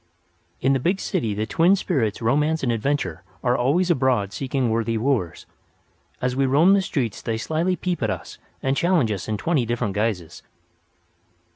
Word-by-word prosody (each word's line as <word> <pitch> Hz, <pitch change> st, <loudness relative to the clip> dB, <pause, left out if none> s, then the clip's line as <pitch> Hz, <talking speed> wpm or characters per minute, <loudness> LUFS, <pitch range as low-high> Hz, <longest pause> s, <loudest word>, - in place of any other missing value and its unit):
In 135 Hz, +1 st, +3 dB
the 135 Hz, -, +1 dB
big 180 Hz, +9 st, 0 dB
city 110 Hz, -, -1 dB
the 105 Hz, +1 st, -1 dB
twin 170 Hz, -, +3 dB
spirits 115 Hz, -, -1 dB
Romance 150 Hz, +7 st, +1 dB
and 125 Hz, -, +1 dB
Adventure 140 Hz, +6 st, -1 dB, 0.2 s
are 125 Hz, -1 st, +2 dB
always 160 Hz, +9 st, +2 dB
abroad 125 Hz, -, +1 dB
seeking 130 Hz, -3 st, -1 dB
worthy 115 Hz, 0 st, 0 dB
wooers. 110 Hz, -, -1 dB, 0.7 s
As 125 Hz, 0 st, -1 dB
we 135 Hz, 0 st, +2 dB
roam 155 Hz, +9 st, +5 dB
the 200 Hz, -, +4 dB
streets 130 Hz, -, -2 dB
they 115 Hz, -1 st, -2 dB
slyly 160 Hz, +10 st, 0 dB
peep 180 Hz, -3 st, -3 dB
at 110 Hz, -, 0 dB
us -, -, -6 dB, 0.2 s
and 135 Hz, +1 st, +1 dB
challenge 170 Hz, -9 st, +2 dB
us 100 Hz, -3 st, -4 dB
in 110 Hz, -1 st, -1 dB
twenty 150 Hz, +3 st, +1 dB
different 120 Hz, -3 st, -2 dB
guises. 105 Hz, -6 st, -2 dB
130 Hz, 170 wpm, -23 LUFS, 110-155 Hz, 0.7 s, roam